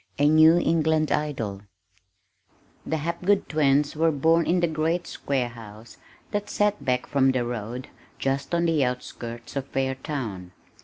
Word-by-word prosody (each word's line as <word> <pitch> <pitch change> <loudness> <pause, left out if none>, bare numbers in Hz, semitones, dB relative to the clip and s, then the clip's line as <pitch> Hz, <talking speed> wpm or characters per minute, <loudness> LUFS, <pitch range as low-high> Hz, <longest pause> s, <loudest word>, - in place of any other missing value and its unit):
A 145 - +4
New 155 +2 +6
England 160 -2 +2
Idol 115 -10 -2 1.3
The 160 - 0
Hapgood 170 +6 0
twins 145 -1 +2
were 165 +2 +3
born 160 +3 +2
in 180 +1 +2
the 170 - +2
great 160 +2 -1
square 130 -3 -2
house 115 -1 -12 0.3
that 205 -1 -2
set 210 0 0
back 125 -1 0
from 135 -2 +2
the 125 -2 -1
road 120 +1 -5 0.3
just 135 +4 -1
on 170 0 +1
the 160 -4 +2
outskirts 120 -1 -5
of 135 -1 -4
Fairtown. 130 -8 -3
145 Hz, 145 wpm, -25 LUFS, 125-160 Hz, 1.3 s, New